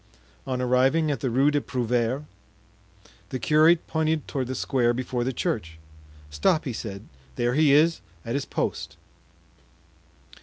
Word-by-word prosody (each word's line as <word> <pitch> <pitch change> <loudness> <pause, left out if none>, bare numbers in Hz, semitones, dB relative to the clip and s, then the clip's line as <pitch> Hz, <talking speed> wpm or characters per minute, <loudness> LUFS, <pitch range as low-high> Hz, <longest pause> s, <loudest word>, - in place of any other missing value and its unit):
On 130 -1 -2
arriving 130 +5 +2
at 140 - -2
the 130 - -1
Rue 135 +5 +3
des 145 -1 +1
Prouvaires, 125 +2 -1 1.1
the 130 - -3
curate 155 +6 +4
pointed 160 -1 -1
toward 130 -3 -3
the 130 - -4
square 120 -3 +1
before 125 -1 -2
the 130 - -1
church. 85 -9 -3 0.5
"Stop!" 75 - +1
he 130 - -3
said, 100 -2 -7 0.3
"there 120 +1 0
he 150 +1 +4
is 160 +3 +4 0.2
at 115 - -3
his 140 0 -1
post." - - -3
130 Hz, 145 wpm, -25 LUFS, 120-150 Hz, 1.1 s, curate